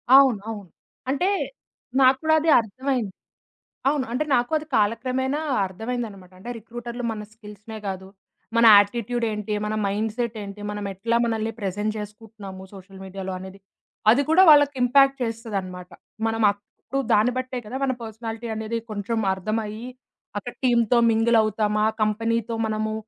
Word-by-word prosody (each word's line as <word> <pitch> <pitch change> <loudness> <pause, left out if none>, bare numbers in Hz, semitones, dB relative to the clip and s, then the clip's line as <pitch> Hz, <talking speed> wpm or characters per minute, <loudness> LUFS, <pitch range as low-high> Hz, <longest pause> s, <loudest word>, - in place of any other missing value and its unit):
అవును. 265 -6 +6
అవును. 205 -5 -7 0.4
అంటే 285 +8 +1 0.7
నాకు 260 0 +6
కూడా 315 0 +3
అది 320 +1 0
అర్థమయింది. 240 0 -2 0.8
అవును. 285 -2 +1
అంటే 265 +5 0
నాకు 245 -1 +1
అది 305 - -10
కాలక్రమేణా 255 +6 0 0.3
అర్థమైందన్నమాట. 205 -2 -5
అంటే 235 +6 -8
రిక్రూటర్‌లు 240 +2 -7
మన 215 -1 -6
స్కిల్స్‌నే 215 0 -10
కాదు, 190 0 -5 0.5
మన 230 - +5
యాటిట్యూడ్ 235 +3 0
ఏంటి, 210 0 -3
మన 215 - -2
మైండ్‌సెట్ 220 +3 -2
ఏంటి, 200 +1 -8
మనం 205 0 -5
ఎట్లా 230 +5 0
మనల్ని 225 -1 -1
ప్రెజెంట్ 205 +2 -2
చేసుకుంటున్నాము 210 -2 -9
సోషల్ 190 0 -12
మీడియాలో 190 0 -6
అనేది 190 +1 -10 0.5
అది 250 +6 +4
కూడా 330 +4 +6
వాళ్ళకి 290 -1 +6
ఇంపాక్ట్ 275 +2 +5
చేస్తదన్నమాట. 200 -6 -4 0.4
మనం 225 0 -1
అప్పుడు 210 +6 -6
దాన్ని 220 +4 +4
బట్టే 255 0 -3
కదా! 240 +5 -5
మన 270 -1 +2
పర్సనాలిటీ 225 +1 -6
అనేది 220 +1 -3
కొంచెం 215 +2 -2
అర్థం 215 +4 -2
అయ్యి, 215 +3 -7 0.5
అక్కడ 240 +4 -7
టీమ్‌తో 235 -1 +4
మింగిల్ 225 +1 +3
అవుతామా, 215 0 +1 0.2
కంపెనీ‌తో 225 +2 0
మనము 215 0 -2
225 Hz, 140 wpm, -24 LUFS, 205-245 Hz, 0.8 s, అవును